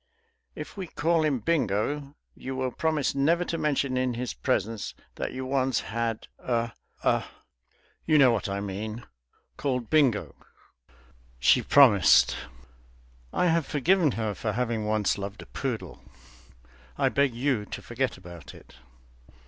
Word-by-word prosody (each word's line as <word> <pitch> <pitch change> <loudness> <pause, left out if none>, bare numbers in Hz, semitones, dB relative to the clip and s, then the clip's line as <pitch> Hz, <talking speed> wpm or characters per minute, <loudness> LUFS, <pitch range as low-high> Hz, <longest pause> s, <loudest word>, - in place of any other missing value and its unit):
If - - -8
we 190 -2 -4
call 165 +1 +1
him 150 -4 +1
Bingo, 120 0 0
will 140 -1 -13 0.2
you 130 -1 -4
promise 155 -3 0
never 165 +6 +2
to 170 - -3
mention 140 -4 0
in 130 -1 0
his 125 +1 -3
presence 115 -5 -2 0.2
that - - -4
you 130 0 -5
once 130 -3 +1
had 115 0 -3
a 115 -2 -1 0.3
a - - +2 0.8
you 155 -1 +5
know 135 -4 +7
what 105 -3 -1
I 100 0 -2
mean 105 +4 -5 0.5
called 125 -5 -2
Bingo?" 135 -9 +3 1.0
She - - +4
promised. 115 -10 +6 1.0
I - - +1
have 165 -3 +2
forgiven 155 0 +2
her 110 -2 -2
for 105 +2 -3
having 115 -2 -1
once 105 -2 +1
loved 100 +1 -6
a - - -15
poodle. 115 - -5 1.0
I - - +3
beg 140 -4 +1
you 120 -4 0
to - - -6
forget 120 -1 -2
about 85 -3 -11
it. - - -17
125 Hz, 140 wpm, -27 LUFS, 110-145 Hz, 1.0 s, know